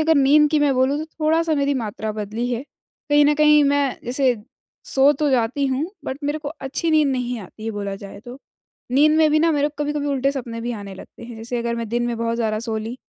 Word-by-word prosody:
अगर 320 +1 +3
नींद 295 +1 +5
की 310 - +3
मैं 285 -2 +3
बोलूँ 260 +2 +2
तो 310 - -3 0.2
थोड़ा-सा 320 +1 +2
मेरी 280 0 +1
मात्रा 220 -3 -4
बदली 215 +3 -4
है, 240 +2 -2 0.5
कहीं 290 0 +5
न 295 +1 +4
कहीं 300 0 +5
मैं 280 -1 +1
जैसे 255 +1 +1 0.5
सो 275 +2 +4
तो 300 -1 +1
जाती 255 +3 +1
हूँ, 265 +3 -1 0.2
बट 265 0 -4
मेरे 295 +2 -1
को 300 -2 -6
अच्छी 305 +2 -3
नींद 310 -2 +4
नहीं 250 -2 -2
आती, 215 +4 -7
बोला 200 -2 -4
जाए 200 0 -11
तो। 245 +2 -9 0.5
नींद 305 +3 +4
में 310 -1 +4
भी 310 - +3
ना 330 +1 +3
मेरे 290 0 +1
को 295 0 -5
कभी-कभी 295 0 -2
उल्टे 275 -1 +1
सपने 235 -4 -5
भी 240 +1 -3
आने 200 -3 -7
लगते 190 - -13
हैं, 235 -1 -9
जैसे 235 +2 -4
अगर 235 0 -2
मैं 230 -1 -4
दिन 240 +2 -1
में 235 -1 -2
बहुत 230 0 -1
ज़्यादा 220 -2 -1
सो 225 -2 -3
ली 225 +2 -5
265 Hz, 240 wpm, -21 LUFS, 230-295 Hz, 0.5 s, नींद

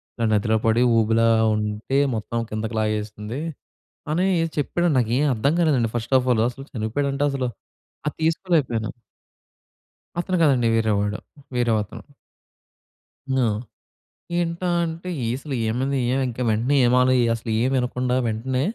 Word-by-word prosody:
ఇలా 115 - -1
నదిలో 110 +1 +2
పడి 115 +2 +3 0.2
ఊబిలా 115 +1 +3 0.3
ఉంటే 105 +5 -2 0.2
మొత్తం 115 +2 -3
కిందకి 110 +1 -4
లాగేసింది, 110 +4 -3 0.7
అని 175 +4 +1 0.2
ఏదో 165 -1 -1
చెప్పాడండి. 175 +3 +1
నాకేం 125 +5 +1
అర్థం 140 +7 +1
కాలేదండి. 135 -9 +2
ఫస్ట్ 120 +3 -3
ఆఫ్ 130 - -4
ఆల్ 110 - +1
అసలు 135 +3 -10
చనిపోయాడంటే 135 +5 -1
అసలు 130 -2 -1 0.6
అది - - -2
తీసుకోలేకపోయాను. 155 - +1 1.3
అతను 185 +1 -1
కాదండీ. 130 -6 +3
వేరేవాడు. 105 -2 +1 0.4
వేరే 120 -2 +2
అతను. 105 - -10 1.3
హ్మ్. 120 -5 +2 0.9
ఏంటా 170 +1 -2 0.2
అంటే, 165 +3 -6 0.2
ఏ - - -1
అసలేమైంది? 130 0 -1
ఏం 135 - +1
ఇంకా 125 +1 -5
వెంటనే 115 +6 +1
ఏమాలో 125 +1 +4 0.2
అసలు 115 0 -4
ఏం 130 - +2
వినకుండా 125 0 0
వెంటనే 125 +4 -1
125 Hz, 130 wpm, -23 LUFS, 110-140 Hz, 1.3 s, ఏమాలో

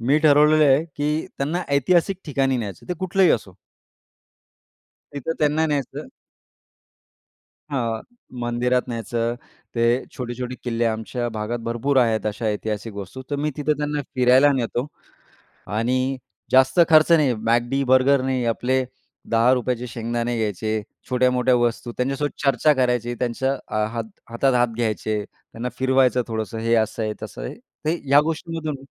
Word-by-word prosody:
मी 135 +6 +3
ठरवलेलं 150 0 +5
आहे, 140 +2 +4
की 150 +2 -1
त्यांना 155 +6 -1
ऐतिहासिक 175 +6 +2
ठिकाणी 135 -3 +1
न्यायचं 100 -7 -6
आहे, - - -21
ते - - -21
कुठलंही 185 0 +3
असो. 100 -5 -3 1.6
तिथं 145 +3 -3
त्यांना 155 +1 +2
न्यायचं. 145 - -3 1.6
हां, 115 -5 -2 0.4
मंदिरात 125 +1 0
न्यायचं, 115 0 -2 0.4
ते 115 -1 +1 0.3
छोटे-छोटे 125 0 -4
किल्ले 120 -1 -1
आमच्या 115 +2 -2
भागात 110 +3 -2
भरपूर 130 +4 0
आहेत. 115 -3 +2
अशा 110 +2 -2
ऐतिहासिक 105 0 -5
वस्तू, 100 +6 -7
तर 145 - 0
मी 150 - +1
तिथं 150 +1 +1
त्यांना 150 0 -1
फिरायला 130 +2 +5
नेतो 120 +1 -2 0.9
आणि 125 +3 +1 0.5
जास्त 130 +4 +5
खर्च 155 +1 +6
नाही, 150 -6 +4 0.2
McD, 120 +4 +2
बर्गर 130 +1 +4
नाही. 130 -2 0
आपले 130 +2 0 0.5
10 115 +2 +4
रुपयाचे 125 -1 -2
शेंगदाणे 120 +1 -2
घ्यायचे, 110 -1 -2 0.4
छोट्या-मोठ्या 125 0 +3
वस्तू 120 0 -1
त्यांच्यासोबत 135 +3 -2
चर्चा 140 +2 +4
करायची, 120 -1 +1
त्यांच्या 125 +3 -1 0.2
अ, 110 0 0
हात 115 -1 -2 0.3
हातात 125 +3 +1
हात 120 0 +3
घ्यायचे, 110 -2 -1
त्यांना 115 +4 -8
फिरवायचं 130 -1 +3
थोडंसं 110 -1 -4
हे 115 +1 +1
असं 110 - -6
आहे 110 -1 -1
तसं - - -7
आहे - - -5 0.3
ते 155 +2 +1
ह्या 140 +1 +6
गोष्टींमधून 160 -1 -3
125 Hz, 140 wpm, -22 LUFS, 115-140 Hz, 1.6 s, खर्च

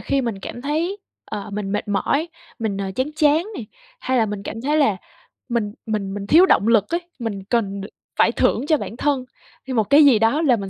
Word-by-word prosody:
khi 275 - 0
mình 230 -5 -3
cảm 240 - -7
thấy, 330 +8 -1 0.3
ờ, 210 0 -6
mình 200 -1 -3
mệt 205 - -2
mỏi, 280 - 0 0.3
mình, 215 -4 -2
ờ, 195 -1 -3
chán 265 +6 -2
chán 305 +2 +3
này, 230 - -6 0.3
hay 260 - 0
là 220 - +3
mình 205 -1 -5
cảm 225 +2 -6
thấy 295 +4 0
là 220 -10 +3 0.5
mình 220 -4 -1
mình 210 -3 -2
mình 200 0 -5
thiếu 340 - +7
động 220 - +3
lực 220 -3 +4
ấy, 345 - +1 0.2
mình 205 -5 -4
cần 200 -5 0
được 200 - -7 0.3
phải - - +5
thưởng - - +1
cho 310 - +4
bản 235 - -7
thân 280 -3 0 0.4
hay 260 - -3
một 225 - +3
cái 290 +1 +7
gì 255 -6 +6
đó 225 +8 +2
là 275 -7 +4
mình 200 -3 -5
230 Hz, 230 wpm, -21 LUFS, 205-290 Hz, 0.5 s, thiếu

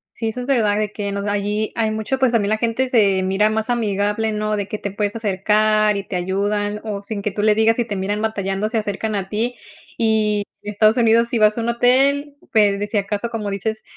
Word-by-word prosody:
Sí, 225 - -2
eso 220 +3 -4
es 245 - -5
verdad, 225 -7 +2
de 215 -1 -2
que 200 -2 -4
nos 200 0 -3
allí 205 +1 -1
hay 220 -1 +1
mucho, 220 +5 -2
pues, 260 -2 +2
también 210 -3 +1
la 215 - +1
gente 235 +3 0
se 200 -6 +3
mira 195 +3 +2
más 220 +2 -2
amigable, 215 -1 0
¿no? 215 0 -1
De 200 -1 -3
que 215 - -4
te 200 - -4
puedes 205 +1 -2
acercar 215 0 +2
y 200 - -2
te 195 - -5
ayudan 205 +3 -1
o 205 -2 -4
sin 200 0 -6
que 210 - -1
tú 205 +1 -4
le 215 0 +4
digas, 220 +1 +3
si 240 - 0
te 205 -3 -4
miran 205 +2 -2
batallando, 200 -2 -1
se 225 - -1
acercan 215 +1 -2
a 195 -2 -3
ti. 225 +4 -1 0.4
Y 215 -2 +2 0.2
Estados 215 +2 +2
Unidos, 230 0 +4
si 235 - -1
vas 215 -1 +4
a 235 - -2
un 230 - -2
hotel, 275 +4 +2 0.2
pues, 205 -3 +3
de 205 - -1
si 205 0 0
acaso, 205 +3 -2
como 215 -3 -3
dices, 220 +3 -3
215 Hz, 235 wpm, -20 LUFS, 205-225 Hz, 0.4 s, le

